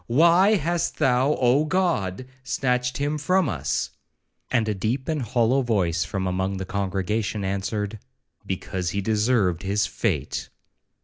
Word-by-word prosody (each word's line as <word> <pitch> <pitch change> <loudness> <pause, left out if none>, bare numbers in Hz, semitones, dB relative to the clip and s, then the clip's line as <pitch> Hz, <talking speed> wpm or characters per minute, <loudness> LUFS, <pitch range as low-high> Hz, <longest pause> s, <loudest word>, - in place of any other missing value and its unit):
Why 170 - +5
hast 170 -1 -1
thou, 130 +3 +3
Oh 130 +4 +4
God! 155 - 0 0.2
snatched 125 -2 0
him 145 +2 -1
from 180 +3 +2
us?'—and 105 - -3
a 105 - +1
deep 115 +7 -2
and 155 -3 -1
hollow 125 +2 +2
voice 90 -8 +1
from 95 +2 -3
among 95 +1 -1
the 95 - -4
congregation 100 +2 -2
answered,—'Because 95 -2 -4
he 100 - -2
deserved 105 -4 +1
his 100 +2 +1
fate.' - - -2
110 Hz, 125 wpm, -24 LUFS, 95-135 Hz, 0.2 s, Why